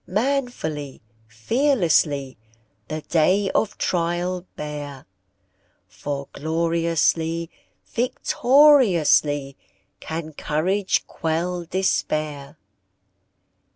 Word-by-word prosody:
Manfully, 210 - -2 0.3
fearlessly, 155 - +1 0.5
The 155 0 -4
day 185 +6 +2
of 215 - 0
trial 175 +1 -1
bear, 145 -3 -7 0.8
For 140 +9 -5
gloriously, 165 +1 0 0.3
victoriously, 235 - +3 0.4
Can 160 -1 -6
courage 185 +7 0
quell 170 +2 -2
despair! 155 -5 -2
165 Hz, 60 wpm, -23 LUFS, 150-190 Hz, 0.8 s, victoriously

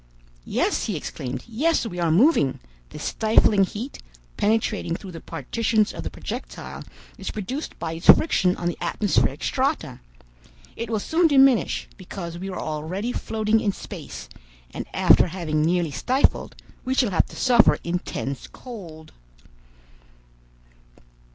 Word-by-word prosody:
"Yes," - - 0
he - - -2
exclaimed, 130 0 -5
"yes, 285 +6 +1
we 180 -5 -5
are 170 -1 +1
moving! 175 - +4 0.3
This - - -8
stifling 215 -2 +3
heat, 230 +8 -7 0.3
penetrating 210 -5 0
through 190 +1 -8
the 165 - -8
partitions 215 - 0
of - - -6
the - - -4
projectile, - - -7 0.4
is - - -4
produced 250 - -5
by 165 -1 -4
its 165 +1 -7
friction 185 - +6
on 175 - -2
the 175 - -3
atmospheric 205 -2 +1
strata. - - -1 0.8
It 230 -1 -5
will 220 -2 0
soon 330 - +2
diminish, 270 -5 +4
because 175 -3 -7
we 190 +2 -5
are 185 - -5
already 160 +9 -3
floating 220 -2 0
in 205 -2 0
space, - - -8 0.4
and - - -6
after - - +5
having 165 -3 -2
nearly 170 0 +1
stifled, 255 - +1 0.3
we 260 +1 -1
shall 245 -6 +2
have 175 - +2
to - - -13
suffer 240 -3 +5
intense 170 -6 -4
cold. 170 -11 -10
200 Hz, 140 wpm, -24 LUFS, 170-230 Hz, 0.8 s, friction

